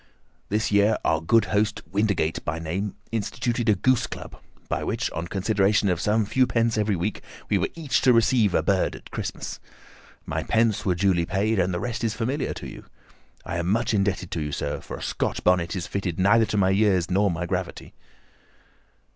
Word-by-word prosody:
This 105 +2 0
year 100 +1 +4
our 80 -1 +2
good 110 +6 +3
host, 105 0 +1
Windigate 100 -6 0
by 80 +1 -2
name, 90 +5 -3 0.2
instituted 115 +1 -1
a 105 - +5
goose 130 +5 +2
club, - - -8 0.3
by - - -2
which, - - -2
on 85 +1 -4
consideration 100 +1 +2
of 90 -2 0
some 110 +1 +2
few 130 +5 +2
pence 115 -1 +1
every 105 -2 +1
week, 90 +4 -3 0.3
we - - +3
were - - 0
each 160 -5 0
to 130 - +5
receive 115 -4 +3
a 80 - +2
bird 95 +1 +1
at - - -13
Christmas. - - -5 0.7
My - - -2
pence 110 -3 +1
were 90 - +2
duly 90 -2 +2
paid, 105 +2 +1
and 90 +1 +1
the 85 - -2
rest 120 +2 -4
is 110 -2 0
familiar 130 +5 -2
to - - -7
you. - - -10 0.6
I 85 - -3
am 85 0 -2
much 115 +4 +1
indebted 100 -3 0
to 80 - -2
you, 75 -1 -3
sir, - - -3
for - - -7
a - - -8
Scotch - - -2
bonnet 90 -1 +2
is 90 -2 -3
fitted 90 -3 -3
neither 110 +4 +4
to 105 - -2
my 95 -1 +3
years 95 -3 +2
nor 100 +2 +3
my 85 0 -2
gravity." 90 0 -4
100 Hz, 195 wpm, -25 LUFS, 90-110 Hz, 0.7 s, a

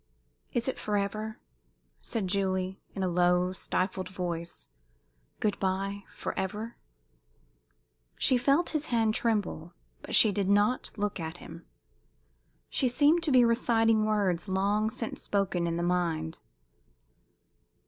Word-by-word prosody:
"Is 240 +1 -1
it 260 - -2
forever?" 215 +2 -2 0.6
said 220 -5 -3
Julie, 190 -1 -1
in 195 - -2
a - - +1
low, 180 +1 +2
stifled 185 0 -2
voice. 170 -2 -5 0.7
"Good 210 -2 0
bye 195 +1 -2
forever?" 210 +5 -4 1.4
She 260 - +4
felt 275 +7 +2
his 310 -1 -2
hand 225 -2 +2
tremble, 205 -8 -1 0.3
but - - -2
she 215 - +8
did 200 -1 -1
not 205 +5 +2
look 205 -2 -2
at 165 +1 -5
him. 165 -1 -11 1.0
She 265 - +1
seemed 295 +7 +4
to 320 -3 0
be 250 -2 +6
reciting 225 -2 +3
words 205 -4 0
long 200 +3 +1
since 225 +1 -5
spoken 190 -4 0
in 170 0 -1
the 170 - -1
mind. 170 -3 -1
200 Hz, 125 wpm, -29 LUFS, 180-225 Hz, 1.4 s, she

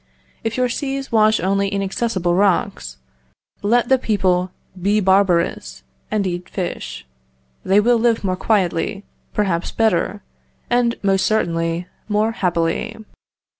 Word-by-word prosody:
If 225 +1 -2
your 255 0 +2
seas 270 +2 -3
wash 220 -1 +4
only 195 +2 +1
inaccessible 195 -2 -1
rocks, 175 - 0 0.6
let 235 +4 +2
the 265 0 +4
people 185 -5 +1 0.3
be 205 +3 +2
barbarous, 190 - +1 0.3
and 210 -2 0
eat 175 -1 -4
fish; 180 - -5 0.6
they 195 +2 +4
will 235 +2 +3
live 230 -1 +2
more 185 -2 0
quietly, 195 0 0 0.3
perhaps 185 -5 0
better, 210 -2 0 0.5
and, 240 -1 +2
most 195 -1 +2
certainly, 165 -5 0 0.2
more 215 +2 +2
happily. 175 0 -1
200 Hz, 120 wpm, -20 LUFS, 180-225 Hz, 0.6 s, wash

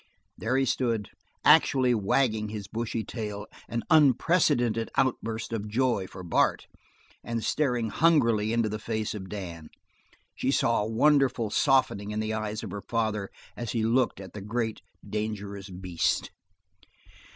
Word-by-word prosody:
There 125 +4 -1
he 135 - +2
stood, 115 -6 -1 0.3
actually 130 -2 +5
wagging 110 0 +1
his 105 -2 -6
bushy 115 +1 -3
tail 105 -3 -5 0.2
an 115 0 -2
unprecedented 140 -6 +3
outburst 115 -3 -1
of 105 -2 -3
joy 115 -3 0
for 95 - -10
Bart! 85 - +1 0.6
and 115 -1 -3
staring 125 -7 0
hungrily 115 -10 +3
into 115 -1 +2
the 105 0 -4
face 110 -1 -2
of 95 -3 -7
Dan. 85 -6 -7 0.7
She - - -1
saw - - +2
a 105 - -2
wonderful 130 -2 +3
softening 130 -7 +2
in 105 0 -2
the 110 0 -1
eyes 110 0 -3
of - - -6
her 100 - -5
father 110 -2 -1 0.3
as 120 -3 -4
he 115 -2 0
looked 120 -1 +2
at 95 -2 -10
the 105 - -7
great, 110 +2 -2 0.3
dangerous 105 -2 -4
beast. 90 -2 -1
110 Hz, 145 wpm, -27 LUFS, 105-120 Hz, 0.7 s, actually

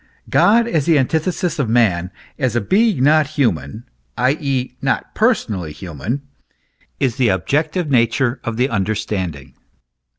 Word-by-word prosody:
God 230 +3 +4
as 160 -11 0
the 165 -3 +5
antithesis 160 +5 -1
of 130 -6 0
man, 100 -7 +2 0.3
as 130 -4 0
a - - +3
being 195 - +2
not 150 +1 +4
human, 110 - -1 0.3
i.e., 130 -1 0
not 135 - -1
personally 110 - 0
human, 90 - -5 0.8
is 130 -3 0
the 130 -3 +3
objective 150 - 0
nature 120 0 +1
of 115 -1 -4
the 125 +2 +2
understanding. 95 - -3
125 Hz, 130 wpm, -19 LUFS, 105-150 Hz, 0.8 s, the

